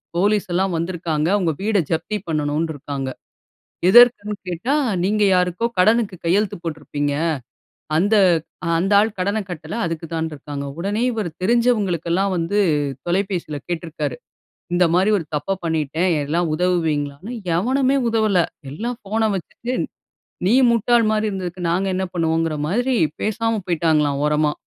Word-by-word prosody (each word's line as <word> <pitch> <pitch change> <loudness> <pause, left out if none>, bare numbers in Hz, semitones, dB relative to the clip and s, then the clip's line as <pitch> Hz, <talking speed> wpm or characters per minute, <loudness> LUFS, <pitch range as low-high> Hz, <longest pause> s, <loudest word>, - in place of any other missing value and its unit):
Police 205 +3 +2
எல்லாம் 190 +1 +1
வந்திருக்காங்க. 165 -2 -1
உங்க 170 -3 +1
வீட 215 0 +2
ஜப்தி 165 +6 -1
பண்ணணுன்ருக்காங்க. 145 -3 -2 0.8
எதற்குன்னு 230 -2 +6
கேட்டா, 180 +10 -1 0.3
நீங்க 210 +3 +2
யாருக்கோ 180 +4 +1
கடனுக்கு 215 +1 +3
கையெழுத்து 195 +4 +2
போட்ருப்பீங்க. 145 -3 -3 0.8
அந்த 200 +7 +3 0.6
அந்த 195 +4 0
ஆள் 220 +2 +1
கடன 200 +4 0
கட்டல, 175 +2 -6
அதுக்கு 165 0 -4
தான்ருக்காங்க. 150 -3 -4
உடனே 205 +6 -1
இவரு 215 -6 -3
தெரிஞ்சவங்களுக்கெல்லாம் 195 -5 +1
வந்து, 170 +4 0 0.5
தொலைபேசில 175 -4 -1
கேட்ருக்கிறாரு. 170 -2 -3 0.6
இந்த 180 +1 +4
மாரி 190 +3 +3
ஒரு 170 - -4
தப்ப 195 +6 -1
பண்ணிட்டேன், 160 +2 0 0.2
எல்லாம் 165 +3 0
உதவுவீங்களான்னு. 160 0 -1 0.3
எவனுமே 260 +7 +2
உதவல. 220 -4 +2 0.3
எல்லாம் 235 - -4
ஃபோனை 220 +2 0
வச்சுட்டு, 235 +6 -5 0.8
நீ 225 - +4 0.2
முட்டாள் 235 0 +3
மாரி 215 0 +1
இருந்ததுக்கு, 185 -2 -5
நாங்க 190 +3 0
என்ன 190 0 -1
பண்ணுவோங்கிற 165 -2 0
மாரி, 245 +7 +1 0.3
பேசாம 225 +1 0
போய்ட்டாங்களாம், 155 -4 +1
ஓரமா. 150 0 +2
180 Hz, 120 wpm, -21 LUFS, 160-210 Hz, 0.8 s, எதற்குன்னு